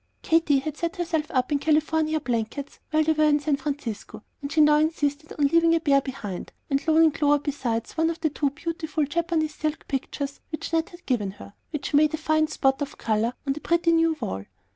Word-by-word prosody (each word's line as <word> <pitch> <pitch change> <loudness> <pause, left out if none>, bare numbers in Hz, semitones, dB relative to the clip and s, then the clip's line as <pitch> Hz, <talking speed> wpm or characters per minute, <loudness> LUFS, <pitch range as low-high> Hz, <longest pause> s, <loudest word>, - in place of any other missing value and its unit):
Katy 320 -3 +3
had 295 +2 -3
set 335 +2 -2
herself 330 -4 -1
up 255 0 0
in 290 - +2
California 310 +1 +1
blankets 250 +1 -3
while 310 0 +3
they 320 - +2
were 310 -1 +3
in 295 0 +3
San 290 0 +1
Francisco, 235 -7 -5 0.2
and 280 0 -5
she 320 - +1
now 300 0 +6
insisted 305 -1 0
on 290 - +3
leaving 330 +3 +4
a - - +2
pair 280 -3 +3
behind, 215 -9 -6 0.2
and 275 +3 0
loaning 320 0 +5
Clover 290 0 +3
besides 260 -6 -3
one 325 0 +2
of 330 0 -4
two 300 -3 0
beautiful 315 0 -3
Japanese 315 0 -1
silk 310 0 -3
pictures 280 +1 -3
which 310 +1 -5
Ned 325 0 +1
had 345 0 -15
given 210 -7 -1
her, - - -11
and 200 - -15 0.2
which 300 -2 -4
made 305 +2 +4
a - - -7
fine 310 0 +2
spot 270 -2 +1
of 280 - -4
color 225 +2 0
on 275 - +1
the 300 - -8
pretty 340 0 +2
new 330 -1 +3
wall. 145 - -4
300 Hz, 210 wpm, -25 LUFS, 275-320 Hz, 0.2 s, now